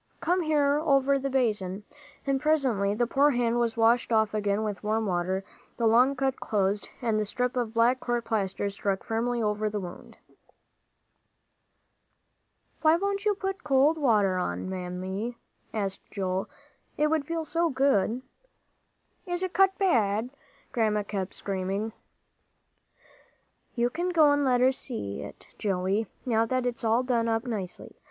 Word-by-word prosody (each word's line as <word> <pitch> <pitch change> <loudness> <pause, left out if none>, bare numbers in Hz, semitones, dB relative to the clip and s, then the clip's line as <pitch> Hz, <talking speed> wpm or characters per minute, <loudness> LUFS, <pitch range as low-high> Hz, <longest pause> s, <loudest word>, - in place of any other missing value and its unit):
"Come 360 +2 +1
here, 295 -3 +2
over 275 -3 +3
the 275 +1 -2
basin." 210 -7 0 0.4
And 275 -1 0
presently 255 -10 +2
the 240 +2 +2
poor 275 +4 +3
hand 240 -3 +1
was 235 -1 0
washed 230 +2 +3
off 220 -1 +3
again 205 0 0
with 210 -2 -4
warm 220 +1 0
water, 185 0 -1 0.3
the 235 - 0
long 245 +5 +5
cut 270 0 -1
closed, 200 -1 -1
and 220 -2 +1
the - - +1
strip 250 +4 -2
of 235 -2 -2
black 240 +3 +4
court 240 -1 -2
plaster 200 -3 -1
stuck 195 -1 -2
firmly 235 +1 -1
over 210 0 0
the 210 0 -3
wound. 180 -2 -9 2.6
"Why 315 +1 +5
don't 400 +2 -1
you 415 -1 +3
put 385 0 -4
cold 295 +3 +3
water 205 -9 +3
on, 90 - -3
Mammy?" 190 +5 -4 0.3
asked 195 -3 -4
Joel; 190 -1 -2 0.5
"it 300 0 +2
would 310 -3 0
feel 330 -1 -2
so 335 +3 +1
good." 260 -4 +1 1.0
"Is 350 +1 -2
it 370 - -3
cut 385 0 +4
bad?" 235 - +1 0.4
Grandma 215 -3 +1
kept 200 -2 -4
screaming. 195 +3 -3 1.8
"You 240 0 +1
can 350 +3 -2
go 315 -4 +5
and 285 0 +2
let 250 -2 +3
her 260 +1 +5
see 165 - -5
it, - - -10
Joey, 195 +2 0 0.2
now 230 -2 +2
that 255 +1 0
it's 245 -1 -2
all 230 +2 +3
done 235 -3 +1
up 225 +1 0
nicely. 205 -7 -6
230 Hz, 150 wpm, -27 LUFS, 205-275 Hz, 2.6 s, long